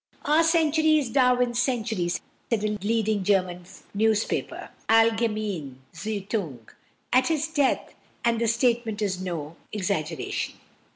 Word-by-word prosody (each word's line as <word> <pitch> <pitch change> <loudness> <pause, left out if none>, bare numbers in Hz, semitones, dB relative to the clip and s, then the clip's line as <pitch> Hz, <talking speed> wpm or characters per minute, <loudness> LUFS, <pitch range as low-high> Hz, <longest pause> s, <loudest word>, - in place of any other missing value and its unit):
"Our 305 +3 +4
century 315 -1 +3
is 270 -6 -1
Darwin's 250 -2 +3
century," 225 -8 -1
said 175 - -5 0.3
a 210 0 0
leading 215 -2 +1
German 180 -3 +1 0.3
newspaper 220 +1 0 0.2
(Allgemeine 215 - +2 0.2
Zeitung) 195 - -4 0.5
at 255 0 +5
his 315 -1 0
death, 290 -4 0 0.3
and 230 -1 +2
the 230 - +2
statement 230 -2 +1
is 185 -2 -1
no 170 -4 -5
exaggeration. 180 -6 -2
220 Hz, 115 wpm, -26 LUFS, 190-250 Hz, 0.5 s, at